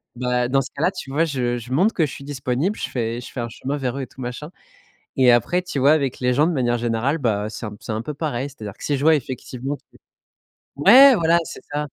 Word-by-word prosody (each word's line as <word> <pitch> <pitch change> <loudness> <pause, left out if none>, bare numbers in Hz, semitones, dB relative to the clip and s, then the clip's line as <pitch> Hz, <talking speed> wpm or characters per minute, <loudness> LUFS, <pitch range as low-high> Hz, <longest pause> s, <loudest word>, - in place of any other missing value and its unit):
bah, 125 0 0
dans 135 +2 +2
ce 135 - -7
cas-là, 165 +6 +2
tu 180 -8 -8
vois, 155 +4 +2
je 125 -5 -1
je 120 +1 -9
montre 190 +11 +3
que 165 - +2
je 140 - -6
suis - - -9
disponible. 140 +7 -2
Je - - -3
fais 115 -1 -2
je 125 - -9
fais 125 - -5
un 115 - -4
chemin 135 +4 -4
vers 135 -2 -3
eux - - -3
et - - -7
tout 130 - -13
machin, 125 +6 -6 0.7
et 130 -2 +6
après, 145 +10 +2
tu 180 -5 -5
vois, 140 +3 +5
avec 140 -5 0
les 125 0 +2
gens, 145 +5 +3
de 175 - 0
manière 120 -5 0
générale 120 +6 0
bah, 105 -6 -1
c'est 110 - -6
un 105 -1 -8
c'est - - -5
un 110 - -2
peu 150 +5 -6
pareil. 140 -3 -3
C'est-à-dire 110 -7 -8
que - - -17
si 145 - 0
je 135 - -4
vois 160 0 +6
effectivement 130 +1 -5
que - - -24 0.9
ouais, 265 +7 +9
voilà, 170 -3 +3
c'est - - -9
ça. 150 +1 -2
135 Hz, 260 wpm, -22 LUFS, 120-150 Hz, 0.9 s, ouais